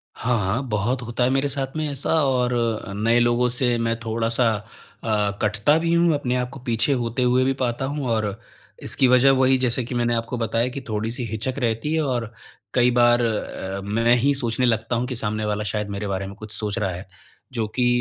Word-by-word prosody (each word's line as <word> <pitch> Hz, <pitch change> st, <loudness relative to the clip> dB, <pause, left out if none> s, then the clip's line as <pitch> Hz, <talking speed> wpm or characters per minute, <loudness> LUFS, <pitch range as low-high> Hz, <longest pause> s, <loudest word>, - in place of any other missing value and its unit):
हाँ, 120 Hz, 0 st, 0 dB
हाँ, 100 Hz, +5 st, 0 dB
बहुत 110 Hz, +5 st, 0 dB
होता 120 Hz, +1 st, -2 dB
है 125 Hz, -, +3 dB
मेरे 135 Hz, +2 st, +1 dB
साथ 135 Hz, 0 st, -3 dB
में 155 Hz, -1 st, -1 dB
ऐसा, 140 Hz, -1 st, -4 dB, 0.2 s
और 125 Hz, -2 st, +1 dB
अ, 115 Hz, -4 st, -1 dB
नए 115 Hz, +4 st, +2 dB
लोगों 120 Hz, +1 st, +3 dB
से 120 Hz, 0 st, +1 dB
मैं 115 Hz, 0 st, 0 dB
थोड़ा-सा 115 Hz, +1 st, 0 dB, 0.6 s
अ, 105 Hz, -2 st, +1 dB
कटता 110 Hz, +8 st, +2 dB
भी 165 Hz, 0 st, 0 dB
हूँ, 170 Hz, -1 st, +4 dB
अपने 125 Hz, -3 st, -1 dB
आपको 125 Hz, +1 st, -3 dB
को -, -, -18 dB
पीछे 120 Hz, +4 st, +1 dB
होते 120 Hz, -1 st, -1 dB
हुए 125 Hz, +1 st, +3 dB
भी 135 Hz, +1 st, +2 dB
पाता 125 Hz, +1 st, -1 dB
हूँ। 140 Hz, -1 st, -3 dB
और 110 Hz, -2 st, +1 dB, 0.6 s
इसकी 130 Hz, -, +2 dB
वजह 125 Hz, +2 st, +6 dB
वही, 130 Hz, 0 st, +4 dB
जैसे 125 Hz, 0 st, 0 dB
कि 125 Hz, +2 st, -5 dB
मैंने 120 Hz, 0 st, +1 dB
आपको 115 Hz, +2 st, -2 dB
बताया 115 Hz, +1 st, 0 dB
कि, 135 Hz, +2 st, -6 dB
थोड़ी-सी 110 Hz, +3 st, -2 dB
हिचक 115 Hz, +5 st, -3 dB
रहती 120 Hz, +5 st, -1 dB
है। 160 Hz, -, +2 dB
और 120 Hz, -5 st, -2 dB, 0.4 s
कई 125 Hz, 0 st, +4 dB
बार 120 Hz, 0 st, +5 dB
अ, 105 Hz, -4 st, -3 dB
मैं 115 Hz, +4 st, +3 dB
ही 135 Hz, +4 st, +2 dB
सोचने 125 Hz, -1 st, 0 dB
लगता 115 Hz, 0 st, +1 dB
हूँ 120 Hz, +2 st, -1 dB
कि 125 Hz, -, -4 dB
सामने 110 Hz, -1 st, -2 dB
वाला 105 Hz, 0 st, -1 dB
शायद 105 Hz, -1 st, -2 dB
मेरे 100 Hz, +1 st, -4 dB
बारे 95 Hz, 0 st, -2 dB
में 100 Hz, -, -9 dB
कुछ 110 Hz, -1 st, -8 dB
सोच 105 Hz, 0 st, -3 dB
रहा 100 Hz, -4 st, 0 dB
है। 90 Hz, +2 st, -7 dB, 0.5 s
जो 115 Hz, -3 st, -1 dB
कि 125 Hz, -1 st, +2 dB
120 Hz, 215 wpm, -23 LUFS, 110-130 Hz, 0.6 s, वजह